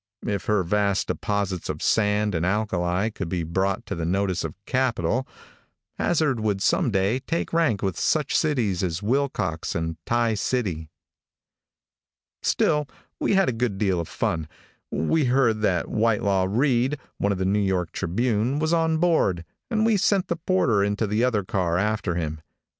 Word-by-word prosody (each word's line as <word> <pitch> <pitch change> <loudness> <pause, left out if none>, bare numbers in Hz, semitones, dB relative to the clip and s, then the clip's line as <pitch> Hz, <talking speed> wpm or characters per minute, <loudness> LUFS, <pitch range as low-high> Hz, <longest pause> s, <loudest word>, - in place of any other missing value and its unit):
If 100 -2 -2
her 105 -3 +2
vast 100 +2 +1
deposits 100 -4 -2
of - - -4
sand 105 -1 +2
and 80 -1 -1
alkali 95 0 0
could 95 -5 -5
be 90 -2 -1
brought 95 +4 -1
to - - -4
the 85 - -4
notice 95 +2 0
of 80 -2 -5
capital, 130 0 0 0.7
Hazzard 155 -7 +1
would 105 -3 0
some 100 - +2
day 100 +4 +1
take 165 +6 -3
rank 160 -11 +2
with 95 -2 -1
such 150 -3 +1
cities 120 - +1
as 90 0 -2
Wilcox 120 - -1
and 80 -1 -2
Tie 120 -1 +2
City. 100 -8 -2 1.5
Still 150 -2 +1 0.3
we - - +1
had 195 -1 +4
a - - +2
good 115 -3 -1
deal 95 -4 +1
of 85 - -3
fun. 80 -2 -2 0.4
We 145 - +1
heard 120 -4 +2
that 95 -5 +1
Whitelaw 105 -4 +1
Reid, 130 +4 +2 0.3
of 100 -1 +1
the 95 - -1
New 100 +2 +2
York 95 -4 0
was 120 - 0
on 160 -1 +2
board, 155 - +2 0.2
and 220 -2 +1
we 225 -2 +3
sent 195 -1 +1
the 170 - +1
porter 160 - +2
into 105 +2 0
the 105 +3 0
other 115 -5 +1
car 90 -2 0
after 105 -2 0
him. 80 -2 -3
105 Hz, 160 wpm, -24 LUFS, 95-130 Hz, 1.5 s, had